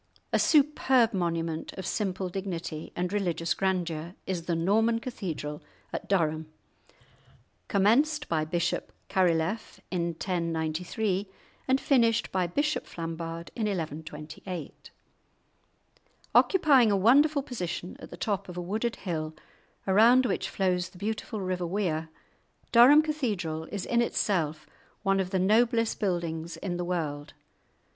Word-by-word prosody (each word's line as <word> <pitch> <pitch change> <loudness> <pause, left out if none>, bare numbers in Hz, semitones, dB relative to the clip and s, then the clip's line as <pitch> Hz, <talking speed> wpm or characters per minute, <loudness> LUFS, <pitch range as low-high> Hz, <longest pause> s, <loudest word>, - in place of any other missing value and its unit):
A - - +4
superb 270 -6 +4
monument 165 -3 -2
of 190 - -7
simple 190 -3 -1
dignity 175 -4 -5
and 180 +2 -2
religious 175 -4 0
grandeur 175 -3 -2
is 175 -3 -3
the 170 - +1
Norman 220 +7 +2
Cathedral 175 - -5 0.3
at - - -5
Durham, 160 -4 0 1.2
commenced 280 +10 +3
by 160 -2 +1
Bishop 170 +2 -1 0.2
Carilef 185 +2 0
in 175 -2 0
1093, 175 +4 -2 0.4
and 265 0 +3
finished 235 -5 +2
by 185 -2 +1
Bishop 295 - -1
Flambard 165 0 -5
in 220 -3 -1
1128. 160 -1 -6 1.4
Occupying 290 - +5
a 200 - +3
wonderful 280 +8 +4
position 180 - -5
at - - -10
the - - -9
top 200 -3 -2
of 180 - -8
a - - -2
wooded 215 +7 -2
hill, 160 -4 -4 0.5
around 230 +7 +6
which - - -1
flows 185 -2 0
the - - -16
beautiful 215 +2 -3
river 185 -2 -2
Wear, 165 -4 -1 0.6
Durham 265 +6 +8
Cathedral 205 - -2
is 200 +1 -5
in 235 0 +2
itself 160 -9 0 0.4
one 195 -1 +2
of 185 -1 -1
the 190 - 0
noblest 230 +4 +2
buildings 170 -4 -2
in 180 -3 -3
the 175 - -2
world. 150 -5 -3
185 Hz, 125 wpm, -28 LUFS, 165-225 Hz, 1.4 s, Durham